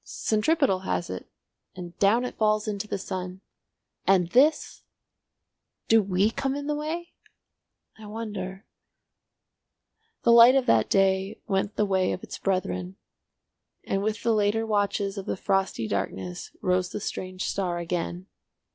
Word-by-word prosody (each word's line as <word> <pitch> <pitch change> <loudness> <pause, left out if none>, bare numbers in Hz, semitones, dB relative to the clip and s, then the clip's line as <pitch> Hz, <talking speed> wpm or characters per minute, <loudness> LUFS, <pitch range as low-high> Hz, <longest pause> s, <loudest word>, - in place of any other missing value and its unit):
Centripetal 220 - +1
has 185 -2 -2
it, 95 - -7 0.5
and 175 -1 -8
down 225 +5 +3
it - - -5
falls 215 0 +1
into 210 0 -3
the - - -2
sun! 185 -1 -6 0.7
And 185 -3 +4
this—! 285 - +3 1.1
"Do 225 0 +6
we 195 +2 +1
come 270 +3 -2
in 285 0 -4
the 300 - -1
way? 320 +4 -4 0.9
I 215 - -10
wonder—" 205 -2 -6 1.6
The 235 - +5
light 235 +2 +8
of 270 -2 +3
that 110 -1 +3
day 195 +1 +2
went 200 0 -1
the 210 - +2
way 190 -2 +1
of 180 - -6
its - - -8
brethren, 95 - -2 0.9
and 195 - -1
with 215 +1 -2
the 230 - +3
later 215 +1 +1
watches 205 -1 0
of 190 - -8
the - - -2
frosty 195 - 0
darkness 95 -3 -4
rose 180 -1 +1
the - - -5
strange 185 -1 -5
star 180 -3 -1
again. 175 +1 -3
195 Hz, 145 wpm, -26 LUFS, 185-220 Hz, 1.6 s, light